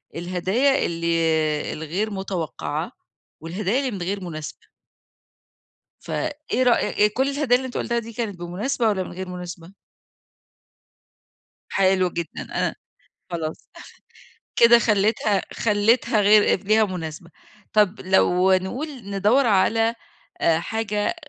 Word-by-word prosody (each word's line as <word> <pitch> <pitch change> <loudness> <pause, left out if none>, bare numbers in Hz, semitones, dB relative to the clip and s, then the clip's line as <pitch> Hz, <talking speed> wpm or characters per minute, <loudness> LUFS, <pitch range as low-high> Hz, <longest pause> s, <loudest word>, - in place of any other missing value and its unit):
الهدايا 190 +11 +1
اللي 165 -2 0
الغير 175 +8 -3
متوقعة 190 -5 -4 0.5
والهدايا 190 +9 -1
اللي 265 -3 -2
من 195 -3 -6
غير 195 +2 -3
مناسبة. 155 -3 -7 1.4
فإيه 300 -4 -2
رأي 230 -3 +3
كل 265 +5 0
الهدايا 275 -3 +2
اللي 260 +1 -1
أنت 250 - -5
قُلتها 235 -1 -1
دي 230 0 -9
كانت 210 -6 -4
بمناسبة 215 +8 -1
والّا 190 -3 0
من - - -9
غير 185 +1 -6
مناسبة؟ 180 0 -8 2.0
حلو 185 -1 +2
جدًا. 170 -1 -5
أنا - - -2 0.6
خلاص. 160 -2 -5 0.9
كده 235 0 +7
خلّيتها 210 -2 +2
خلّيتها 215 +1 +2
غير 205 -1 +4
ليها 215 +2 +4
مناسبة. 170 -2 -6 0.4
طَب، 210 -1 +3
لو 190 0 +3
نقُول 190 +12 -1 0.2
ندوّر 210 +7 +3
على 225 +3 +2 0.5
آآ، 165 -1 +3
حاجة 210 - -2
200 Hz, 115 wpm, -23 LUFS, 175-230 Hz, 2.0 s, كده